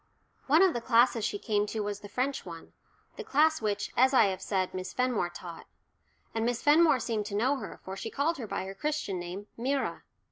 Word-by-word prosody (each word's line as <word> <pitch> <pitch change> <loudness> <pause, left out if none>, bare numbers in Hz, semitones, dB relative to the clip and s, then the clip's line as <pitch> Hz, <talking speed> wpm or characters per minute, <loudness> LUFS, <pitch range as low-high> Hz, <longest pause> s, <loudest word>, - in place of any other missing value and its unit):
One 310 +6 +6
of 375 - +4
the 240 - -3
classes 230 -1 +3
she 205 - -1
came 210 0 0
to 220 +1 -3
was 205 -1 -3
the 205 - -11
French 260 +5 -1
one 165 -2 -10 0.4
the 460 - -5
class 315 - +3
which, 205 -1 -2
as 260 +2 +4
I - - +7
have 190 - -4
said, 190 -2 -1
Miss 185 0 -5
Fenmore 250 -8 0
taught. 175 -1 -10 0.7
And 225 - -1
Miss 240 0 -1
Fenmore 305 -2 +5
seemed 220 -3 -2
to 205 - -5
know 255 +7 +2
her, 215 -7 -8
for 190 - -5
she 225 - -5
called 295 +5 -1
her 230 - -5
by - - -3
her 195 - -6
Christian 295 -8 -2
name 180 +4 -6
"Myra." 270 +4 -1
230 Hz, 215 wpm, -29 LUFS, 200-270 Hz, 0.7 s, I